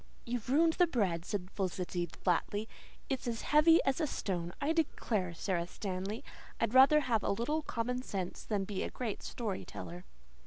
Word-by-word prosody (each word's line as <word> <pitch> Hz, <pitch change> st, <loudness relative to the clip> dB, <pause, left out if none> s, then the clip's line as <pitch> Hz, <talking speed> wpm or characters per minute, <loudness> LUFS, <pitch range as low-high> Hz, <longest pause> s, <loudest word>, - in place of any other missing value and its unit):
"You've 240 Hz, -1 st, -3 dB
ruined 320 Hz, +4 st, +5 dB
the 355 Hz, +1 st, +4 dB
bread," 185 Hz, -, 0 dB
said 185 Hz, -2 st, -3 dB
Felicity 180 Hz, -2 st, -2 dB
flatly. 195 Hz, +5 st, -1 dB, 0.4 s
"It's 265 Hz, -3 st, -2 dB
as 230 Hz, -2 st, -2 dB
heavy 320 Hz, +2 st, +6 dB
as 270 Hz, +4 st, +1 dB
a 310 Hz, -, +2 dB
stone. 175 Hz, -9 st, -2 dB
I 295 Hz, +3 st, +1 dB
declare, 215 Hz, -, 0 dB
Sara 175 Hz, -1 st, -1 dB
Stanley, 195 Hz, +6 st, -4 dB, 0.4 s
I'd 230 Hz, 0 st, 0 dB
rather 275 Hz, +4 st, +8 dB
have 235 Hz, -6 st, +1 dB
a -, -, -1 dB
little 265 Hz, +10 st, 0 dB
common 250 Hz, -2 st, -2 dB
sense 190 Hz, -7 st, -4 dB
than 205 Hz, -3 st, -1 dB
be 195 Hz, -1 st, -3 dB
a -, -, -2 dB
great 230 Hz, -5 st, -4 dB
story 215 Hz, -6 st, -4 dB
teller." 175 Hz, +1 st, -8 dB
220 Hz, 170 wpm, -33 LUFS, 185-265 Hz, 0.4 s, rather